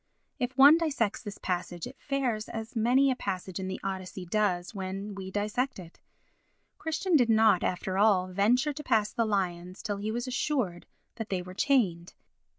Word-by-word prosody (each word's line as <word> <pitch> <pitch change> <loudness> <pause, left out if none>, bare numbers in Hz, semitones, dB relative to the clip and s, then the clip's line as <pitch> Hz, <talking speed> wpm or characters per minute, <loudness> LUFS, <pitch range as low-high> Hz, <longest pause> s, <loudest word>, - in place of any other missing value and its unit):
If 250 +1 -2
one 285 +4 +8
dissects 275 -11 0
this 205 -3 -7
passage 175 -2 -3
it 260 - -9
fares 255 -6 -1
as 225 +2 -6
many 250 +5 +4
a - - 0
passage 190 -4 -4
in 190 - -4
the 190 - -4
Odyssey 190 -1 -5
does 180 -1 0
when 195 +1 -5
we 190 -1 -7
dissect 215 +7 -1
it. 175 -3 -12 0.8
Christian 320 +3 0
did 245 -5 +4
not, 220 -4 +5
after 185 +1 -1
all, 200 -3 +4
venture 225 +10 +2
to 300 - -7
pass 215 -5 +2
the 230 - +1
lions 180 -3 -2
till 205 -3 -2
he 205 +2 -3
was 240 +2 -2
assured 255 - -1 0.3
that 225 -2 -5
they 185 -2 -1
were 180 0 -9
chained. 185 -9 +1
210 Hz, 175 wpm, -29 LUFS, 185-250 Hz, 0.8 s, one